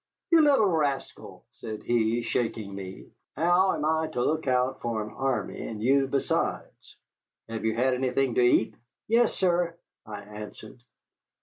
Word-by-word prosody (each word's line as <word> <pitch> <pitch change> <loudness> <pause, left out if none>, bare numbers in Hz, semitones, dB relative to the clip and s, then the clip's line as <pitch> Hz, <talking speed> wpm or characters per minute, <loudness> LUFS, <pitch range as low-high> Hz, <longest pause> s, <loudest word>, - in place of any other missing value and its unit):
"You 335 -1 +7
little 280 -7 +5
rascal," 150 -7 -2
said 110 -1 -8
he, 115 0 +1
shaking 115 -3 -2
me, 95 -1 -9 0.2
"how 175 +5 +3
am 150 - -2
I 160 0 +1
to 120 - 0
look 155 -1 -1
out 130 +1 +1
for 115 -2 -2
an 105 - -9
army 135 -1 -2
and 110 -2 -6
you 135 +4 +3
besides? 135 0 -2 0.5
Have 115 -1 -5
you 110 0 +1
had 130 +2 +2
anything 130 0 0
to 125 - +2
eat?" 120 -2 +3 0.3
"Yes, 230 +1 +3
sir," 175 -2 +1 0.3
I 105 -1 -7
answered. 105 +3 -10
125 Hz, 150 wpm, -27 LUFS, 110-160 Hz, 0.5 s, You